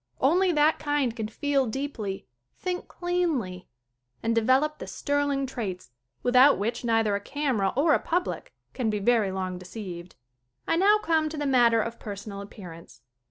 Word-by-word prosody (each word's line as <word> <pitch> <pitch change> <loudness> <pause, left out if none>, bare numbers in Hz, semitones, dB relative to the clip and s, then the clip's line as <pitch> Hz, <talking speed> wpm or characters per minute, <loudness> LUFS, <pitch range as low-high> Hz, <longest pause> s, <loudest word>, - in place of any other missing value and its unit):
Only 360 +7 +3
that 300 +1 +3
kind 290 -5 0
can 220 -3 -3
feel 275 +3 0
deeply, 220 -6 -4 0.3
think 360 -1 -4
cleanlv 320 - -2 0.6
and 230 - +1
develop 260 +7 +2
the - - -7
sterling 285 -1 -1
traits 195 - -5 0.3
without 255 +3 +6
which 230 +5 -2
neither 225 -3 +2
a - - -1
camera 255 -6 0
or 295 +4 +4
a - - +3
public 355 +2 -2 0.2
can 245 -4 -1
be 210 - 0
very 210 -1 +2
long 185 -1 -3
deceived. 180 -2 -8 0.5
I 330 - +2
now 400 +5 +5
come 320 -5 +1
to 310 - -7
the 295 - -2
matter 240 -4 +4
of 230 0 -6
personal 200 -1 -7
ap 200 - -9
pearance. 165 - -12
245 Hz, 160 wpm, -27 LUFS, 205-295 Hz, 0.6 s, without